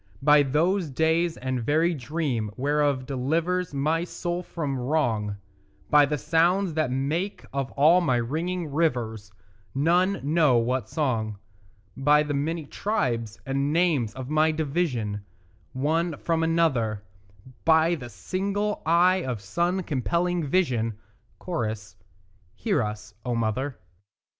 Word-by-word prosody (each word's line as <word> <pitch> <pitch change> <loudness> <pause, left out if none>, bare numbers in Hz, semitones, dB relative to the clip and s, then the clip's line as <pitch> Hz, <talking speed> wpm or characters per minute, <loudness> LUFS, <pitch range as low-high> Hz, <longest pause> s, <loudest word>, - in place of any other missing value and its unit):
By 150 0 +6
those 160 +6 +1
days 160 +4 +1
the 130 -1 -3
very 160 +7 +2
dream 135 -5 -2
whereof 145 -1 +1
delivers 165 +7 -1
My 155 +4 0
soul 175 0 -3
from 145 -7 -4
wrong; 120 -7 0 0.5
By 145 -1 +6
the 150 +1 -1
sounds 175 +5 +2
that 155 -3 0
make 150 +10 -2
of 140 -1 -2
all 160 +6 +5
my 150 -8 +2
ringing 160 +7 -2
rivers 115 -10 -1 0.4
None 175 +7 +2
knows 145 -6 +3
what 125 -3 -1
song; 115 -9 -1 0.6
By 150 +3 +4
the 150 -1 -3
many 155 +3 -2
tribes 120 - -2
and 140 +2 0
names 155 -10 +1
of 130 -1 -6
my 155 +2 +3
division 140 - -1 0.5
One 160 +4 0
from 165 -1 0
another; 135 -11 +1 0.6
By 160 - +4
the 125 -7 -5
single 195 - -2
eye 175 +3 +5
of 125 -4 -3
sun 175 - -1
compelling 170 +4 0
vision; 125 - +1 0.5
(Cho.) 115 -12 -1 0.8
Hear 200 - 0
us, 105 -1 -5
O 120 -1 -1
mother. 115 +4 -1
150 Hz, 125 wpm, -26 LUFS, 125-170 Hz, 0.8 s, By